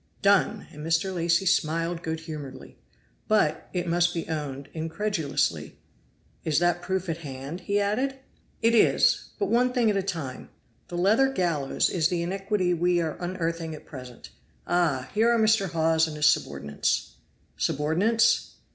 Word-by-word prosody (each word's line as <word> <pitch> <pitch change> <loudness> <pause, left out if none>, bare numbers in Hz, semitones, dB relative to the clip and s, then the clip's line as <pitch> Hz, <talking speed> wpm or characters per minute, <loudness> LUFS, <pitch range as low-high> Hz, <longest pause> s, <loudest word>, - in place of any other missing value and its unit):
"Done!" 200 0 +3
and 150 -2 -9
Mr. 165 +4 0
Lacy 170 +1 +1
smiled 165 0 +1
good 160 -1 -4
humoredly, 150 -5 -8 0.5
but, 210 -8 +1
it 180 -1 -2
must 175 +1 +1
be 165 - -3
owned, 145 -3 -4
incredulously. 160 - -2 0.7
"Is 155 -2 0
that 175 0 +2
proof 190 0 -2
at 165 -1 -2
hand?" 140 +2 -7
he 200 0 0
added. 255 +7 0 0.5
"It 230 +1 +4
is. 230 - +4
But 400 - -1
one 250 +2 +3
thing 235 -4 +3
at - - -2
a - - +1
time 165 -9 -5 0.4
the 175 - -6
leathern 225 +9 +3
gallows 155 -7 +1
is 165 -4 +1
the 175 -1 -1
iniquity 195 0 0
we 175 +1 +2
are 160 -2 -2
unearthing 165 -2 -3
at - - -13
present. 125 -4 -11 0.3
Ah! 160 -8 0
here 225 +2 +3
are 235 - +3
Mr. 220 -3 +3
Hawes 160 -1 +2
and 155 - -6
his 150 - +1
subordinates." 70 - 0 0.4
"Subordinates?" 175 +11 +1
170 Hz, 155 wpm, -26 LUFS, 155-195 Hz, 0.7 s, It